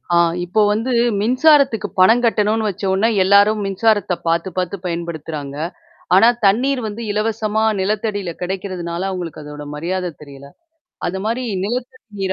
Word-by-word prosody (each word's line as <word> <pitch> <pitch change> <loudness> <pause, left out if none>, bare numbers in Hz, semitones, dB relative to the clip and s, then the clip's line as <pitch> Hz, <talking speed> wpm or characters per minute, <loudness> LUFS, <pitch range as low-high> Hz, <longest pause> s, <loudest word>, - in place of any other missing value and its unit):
ஆ - - +5 0.3
இப்போ 200 +5 +1
வந்து 225 +5 -1 0.3
மின்சாரத்துக்கு 255 0 +3
பணம் 225 +6 +6
கட்டணும்னு 220 -1 +1
வச்ச 200 - -8
ஒனே 205 +4 +2
எல்லாரும் 200 +2 +4
மின்சாரத்த 200 -1 +1
பாாரத்து 170 +3 0
பாார்த்து 185 +1 -2
பயன்படுத்துறாங்க. 160 -4 -5 0.6
ஆனா 210 +5 +7 0.2
தண்ணீர் 250 +7 +3
வந்து 215 +2 -6
இலவசமா 215 0 0 0.2
நிலத்தடியில 205 -2 -2
கிடைக்கிறதுனால 180 -2 -4
அவங்களுக்கு 175 -4 -6
அதோட 150 0 -8
மரியாதை 180 +3 -3
தெரியல. 140 -1 -12 0.6
அது 190 +2 -3
மாரி 235 +3 -1 0.2
நிலத்தடி 250 +4 -5 0.2
நீர 190 -1 0
200 Hz, 130 wpm, -19 LUFS, 175-220 Hz, 0.6 s, ஆனா